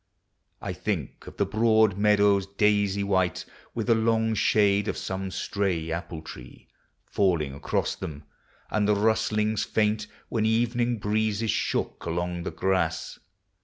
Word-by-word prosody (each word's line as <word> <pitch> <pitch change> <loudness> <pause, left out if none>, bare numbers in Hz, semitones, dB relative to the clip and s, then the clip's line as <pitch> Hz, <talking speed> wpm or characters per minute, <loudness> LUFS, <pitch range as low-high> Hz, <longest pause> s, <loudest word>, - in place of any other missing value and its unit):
I - - -3
think - - -4
of - - -11
the - - +2
broad 110 -2 +3
meadows, 100 -1 +3
daisy 100 0 +1
white, 95 -3 0 0.3
With 115 - -2
the 115 - +4
long 110 0 +2
shade 100 -1 +3
of - - -2
some 95 0 -4
stray 95 -4 -2
apple 85 -1 -5
tree 65 -4 -11 0.4
Falling 85 -8 +1
across 70 - -1
them, 75 -1 -7 0.2
— - - -33
and 105 -1 +1
the 105 - +4
rustlings 110 0 +1
fainl 110 0 0 0.2
When 110 - -1
evening 120 +2 +1
breezes 110 +1 0
shook - - -2
along 85 +1 -2
the 85 - -3
grass. 90 -4 -1
100 Hz, 140 wpm, -26 LUFS, 95-110 Hz, 0.4 s, the